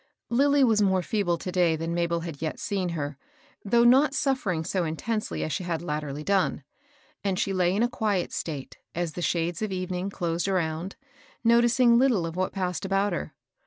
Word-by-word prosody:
Lilly 280 +3 +4
was 220 -4 +4
more 190 -2 +2
feeble 175 -4 0
to 180 - -5
day 175 -3 +2
tUan 165 +1 -3
Mabel 170 0 0
had 165 -4 -7
yet 160 -1 -3
seen 190 -3 -2
her, 145 -2 -4 0.4
though 235 +3 +3
not 270 +4 +5
suffering 260 - 0
so 185 +1 0
intensely 215 +8 -2
as 155 - -3
she 190 - -2
had 170 -2 -3
latterly 150 -2 -4
done; 195 -5 +1 0.6
and 195 -2 0
she 195 - 0
lay 180 0 +2
in 215 - +2
a - - +3
quiet 215 -7 -1
state, 145 -5 -5 0.2
as 170 -2 -2
the 175 - -5
shades 170 0 -1
of 215 -2 -2
evening 185 0 -3
closed 170 -2 -2
around, 175 -1 -1 0.5
noticing 235 +1 +5
little 245 -10 +3
of 165 0 -5
what 185 0 -1
passed 180 -4 -2
about 195 0 +1
her. 155 -3 -5
185 Hz, 190 wpm, -26 LUFS, 170-215 Hz, 0.6 s, not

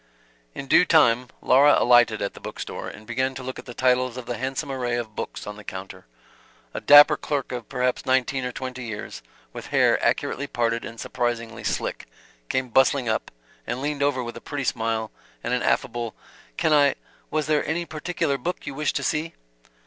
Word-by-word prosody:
In - - -5
due 135 - +6
time 125 -8 +4 0.2
Laura 140 +3 +6
alighted 120 -3 +4
at 100 - -3
the - - -12
book - - -8
store, - - -5
and 110 - -10
began 130 +3 -1
to 130 - -7
look 130 0 -6
at - - -11
the 120 - -8
titles 125 -1 +2
of 125 - -6
the 120 - -3
handsome 135 +3 -3
array 125 -2 -1
of 115 -3 -4
books - - -5
on 105 0 -7
the 105 - -11
counter. 95 -7 -8 0.7
A - - -4
dapper 145 0 +8
clerk 140 -3 -3
of 120 -3 -6
perhaps 125 -1 0
nineteen 130 0 +1
or 125 - -2
twenty 130 0 -6
years, 110 -3 -6 0.3
with - - -8
hair - - +3
accurately 140 +2 0
parted 115 -2 -1
and 115 0 -9
surprisingly 115 -2 -3
slick, - - -3 0.4
came 130 -1 -1
bustling 130 +1 +3
up 110 - -1 0.4
and 120 +2 -2
leaned 145 +1 -2
over 140 -3 +1
with 120 0 -6
a 120 - -9
pretty 145 -2 -4
smile 115 -3 -1 0.3
and - - -1
an - - +1
affable 120 -1 -1 0.4
"Can 155 - +2
I 145 -2 +5 0.3
was 155 -1 -1
there 150 0 +2
any 170 +3 -1
particular 155 -3 -2
book 175 +8 -4
you - - -5
wished 150 +2 -1
to - - -1
see?" 160 +1 -1
130 Hz, 195 wpm, -24 LUFS, 120-140 Hz, 0.7 s, dapper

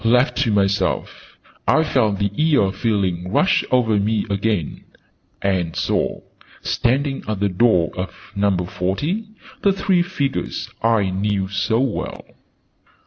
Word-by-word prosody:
Left 125 +4 +3
to 130 -5 +2
myself, 100 -2 -1 0.3
I 155 - +4
felt 110 -9 +1
the 100 0 0
'eerie' 150 -11 +3
feeling 95 -4 -1
rush 190 - +3
over 115 -5 +3
me 105 +1 0
again, 100 -5 -1 0.6
and 90 -4 0
saw, - - -1 0.4
standing 135 +3 0
at 110 -2 -2
the 100 0 +1
door 90 -3 +3
of 90 +1 -7
Number 100 -3 +1
Forty, 145 - -2 0.4
the 200 - +4
three 190 -2 +2
figures 155 -6 -3
I 110 -4 +2
knew 95 0 -1
so 110 +3 0
well. 135 -5 -3
105 Hz, 130 wpm, -21 LUFS, 95-130 Hz, 0.6 s, I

